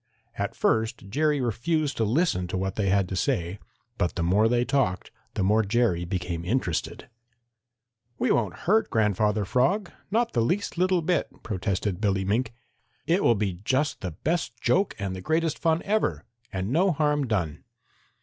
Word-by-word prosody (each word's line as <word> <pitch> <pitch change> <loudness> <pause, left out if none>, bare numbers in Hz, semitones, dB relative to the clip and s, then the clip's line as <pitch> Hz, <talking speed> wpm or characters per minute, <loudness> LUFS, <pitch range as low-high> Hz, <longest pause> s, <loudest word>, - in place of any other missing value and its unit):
At - - -3
first 110 -3 0
Jerry 150 +5 +1
refused 145 +6 0
to 115 - +2
listen 110 - +1
to 90 - -3
what 95 0 -2
they 100 -3 0
had 100 -1 +2
to 95 - -3
say, 90 +1 -1 0.4
but 90 - 0
the 85 - -1
more 100 +6 +4
they 120 0 +2
talked 125 -9 0 0.2
the 95 - 0
more 105 +3 +4
Jerry 105 -5 +1
became 85 -2 -3
interested. 90 -4 -2 1.1
"We - - +1
won't 105 -7 0
hurt 215 +5 +3
Grandfather 105 -1 +1
Frog, 175 - +1 0.2
not 230 +3 +1
the 120 - +2
least 185 - 0
little 180 -1 +2
bit," 170 -1 +1
protested 100 -1 -2
Billy 95 -2 +1
Mink. 115 +4 0 0.5
"It 180 +4 +2
will 120 - +5
be 100 -4 -2
just 135 +6 0
the 95 - -3
best 160 -7 -1
joke 195 +9 +1
and 100 -2 -3
the 95 - -6
greatest 160 - 0
fun 165 0 +1
ever, 195 - 0 0.3
and 95 +3 -3
no 180 +6 +3
harm 150 -3 +1
done." 90 -9 -2
110 Hz, 170 wpm, -26 LUFS, 95-155 Hz, 1.1 s, will